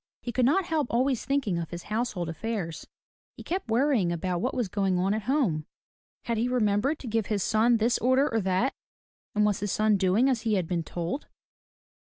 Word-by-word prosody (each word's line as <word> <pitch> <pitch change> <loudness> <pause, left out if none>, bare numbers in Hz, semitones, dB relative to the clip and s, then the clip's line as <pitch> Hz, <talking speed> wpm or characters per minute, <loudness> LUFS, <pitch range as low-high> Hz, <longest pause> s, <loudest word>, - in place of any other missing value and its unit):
He 240 - -3
could 245 +1 +2
not 365 +7 +2
help 310 -5 0
always 255 +1 +1
thinking 270 -11 0
of 165 - -5
his 175 -1 -7
household 210 -5 -2
affairs. 170 0 -4 0.5
He - - -9
kept 360 -7 -3
worrying 230 -6 +2
about 175 +1 -2
what 250 - -1
was 245 -5 0
going 190 -1 0
on 190 +3 +1
at 220 - -1
home. 195 - +1 0.6
Had 230 -2 -1
he 235 - +1
remembered 245 +3 +1
to 260 - -7
give 225 -2 0
his 205 -4 0
son 230 +2 +3
this 230 +2 +1
order 260 +4 +3
or 225 -1 0
that? 190 +8 +1 0.6
And 210 0 +3
was 205 -2 +1
his 205 -1 -2
son 215 -1 +3
doing 195 +7 +3
as 255 -4 +1
he 220 -2 +1
had 180 -4 0
been 175 -1 -1
told? 175 - -4
220 Hz, 205 wpm, -27 LUFS, 185-250 Hz, 0.6 s, son